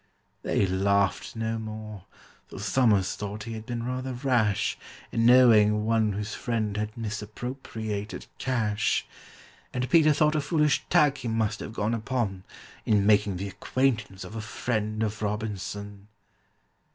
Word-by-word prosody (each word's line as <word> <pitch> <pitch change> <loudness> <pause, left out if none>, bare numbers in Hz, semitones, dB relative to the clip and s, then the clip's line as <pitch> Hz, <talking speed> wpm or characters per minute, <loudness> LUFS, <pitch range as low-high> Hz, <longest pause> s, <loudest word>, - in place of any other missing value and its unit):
They - - +1
laughed 100 +2 +1
no 115 0 -2
more, 110 -3 -7 0.4
for - - -10
SOMERS 105 -1 +2
thought 105 +1 -5
he 115 - -6
had 110 +1 -7
been 120 -2 -3
rather 130 +1 -3
rash 115 -6 +1 0.4
In 115 0 +2
knowing 110 -4 +6
one 110 -2 +2
whose 105 +1 -4
friend 110 -4 -2
had 105 +1 -3
misappropriated 110 -1 -5
cash; 110 -5 0 0.7
And 125 0 -2
PETER 155 -1 +5
thought 150 +1 +3
a 155 - +1
foolish 150 0 +2
tack 150 -5 +4
he 120 - -5
must 110 -2 0
have 110 - -7
gone 110 0 -1
upon 110 -5 -2 0.4
In 105 -2 +2
making 105 -2 +3
the 100 +3 -4
acquaintance 110 -4 -1
of 95 +4 -9
a 110 - -3
friend 110 0 -2
of 110 0 -3
ROBINSON. 105 -1 -4
110 Hz, 140 wpm, -27 LUFS, 105-120 Hz, 0.7 s, knowing